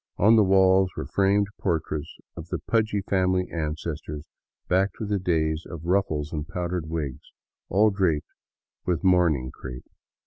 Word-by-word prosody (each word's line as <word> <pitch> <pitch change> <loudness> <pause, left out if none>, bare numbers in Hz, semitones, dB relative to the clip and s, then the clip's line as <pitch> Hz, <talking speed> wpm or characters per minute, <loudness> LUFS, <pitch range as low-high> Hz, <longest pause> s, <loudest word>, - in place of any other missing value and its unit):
On 110 +4 +6
the 110 - +6
walls 95 -1 +4
were - - -3
framed 100 +6 +2
portraits 80 -3 -2 0.2
of 80 - -8
the - - -2
pudgy 110 -3 0
family 95 -1 +1
ancestors 75 -1 -4 0.4
back 95 +2 +2
to 110 - -4
the 100 -1 0
days 80 -3 0
of 85 -1 -8
ruffles 85 -5 0
and 75 -1 -3
powdered 90 -2 -3
wigs, 75 -5 -4 0.4
all 105 +3 +4
draped 90 -7 0 0.5
with 90 -1 -1
mourning 85 -9 +3
crepe. 65 -1 -9
90 Hz, 145 wpm, -25 LUFS, 80-95 Hz, 0.5 s, On